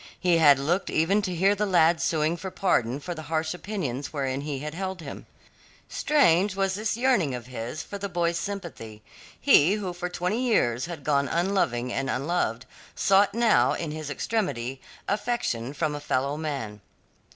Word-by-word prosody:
He 175 -2 +3
had 145 -4 +7
looked 165 +8 0
even 190 +7 +2
to 185 -3 -3
hear 195 +4 +3
the 210 +1 -1
lad 170 -3 +4
suing 160 +1 +1
for 190 +2 -6
pardon 130 -10 0
for 175 +4 -5
the 160 - -7
harsh 160 0 0
opinions 175 - -4
wherein 135 -2 -2
he 145 -1 -4
had 150 +3 -5
held 190 +1 -4
him. 160 - -9 0.6
Strange 200 - +3
was 195 -1 0
this 215 +2 -2
yearning 235 - +2
of 120 -1 -7
his 125 +3 -6
for 200 - -7
the 200 0 -4
boy's 170 -1 0
sympathy. 160 - -7 0.4
He 165 +7 +5
who 200 -4 -3
for 180 0 -4
twenty 180 +6 -1
years 130 - +1
had 165 -5 -7
gone 140 -1 +1
unloving 140 -9 0
and 135 0 -2
unloved, 130 -4 -1 0.3
sought 195 +2 +3
now 235 -2 +4
in 165 -3 -4
his 155 -1 -5
extremity 135 - -2 0.3
affection 205 - -1
from 150 +1 -2
a 145 - -4
fellow 140 0 -1
man. 135 -10 -4
165 Hz, 175 wpm, -26 LUFS, 140-195 Hz, 0.6 s, had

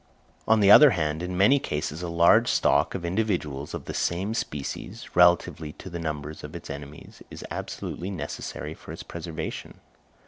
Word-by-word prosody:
On 110 -1 +4
the 100 0 +6
other 150 +6 +10
hand, 75 0 -1
in 90 0 -4
many 125 +9 +5
cases, 75 - -4
a 90 - -3
large 85 +8 +5
stock - - +2
of 90 -3 -4
individuals 85 -8 -2
of - - -7
the - - -5
same 95 +5 -1
species, 75 -10 -5
relatively 85 -3 +3
to 95 - -11
the 85 - -5
numbers 75 -2 -5
of 75 +2 -8
its 85 - -7
enemies, 70 +1 -10
is - - -9
absolutely 90 +3 -5
necessary 80 -7 -5
for - - -12
its - - -8
preservation. 85 -1 -6
85 Hz, 170 wpm, -26 LUFS, 75-95 Hz, -, other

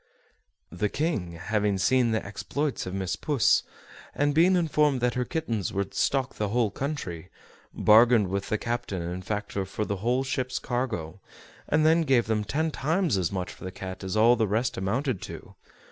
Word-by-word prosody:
The 100 +4 -1
King, 125 - -2
having 100 +3 0
seen 120 +6 +3
the 110 -1 -1
exploits 140 +5 -3
of 90 - -5
Miss 95 -1 -2
Puss, 145 -7 +2 0.5
and 145 0 +1
being 175 +5 +5
informed 150 -5 +2
that 125 0 +1
her 125 0 -1
kittens 120 - -2
would 100 0 -2
stock 135 -2 0
the 105 - -2
whole 110 0 +1
country, 95 - -5 0.4
bargained 110 -2 +5
with 100 0 -2
the 110 - +1
captain 115 -6 -3
and 90 +2 -5
factor 105 0 -3
for 100 +3 -4
the 100 - -2
whole 120 +6 0
ship's 130 -1 -2
cargo, 110 -9 -3 0.5
and 155 +1 +3
then 165 +1 +5
gave 135 -6 +3
them 110 -1 0
ten 155 +9 -1
times 160 - 0
as 90 -3 0
much 95 -2 -3
for - - -14
the 95 - -5
cat 95 +1 -7
as 95 +2 -2
all 115 +3 +6
the 110 -2 +1
rest 110 +5 0
amounted 115 +4 -1
to. - - -9
115 Hz, 180 wpm, -27 LUFS, 95-135 Hz, 0.5 s, all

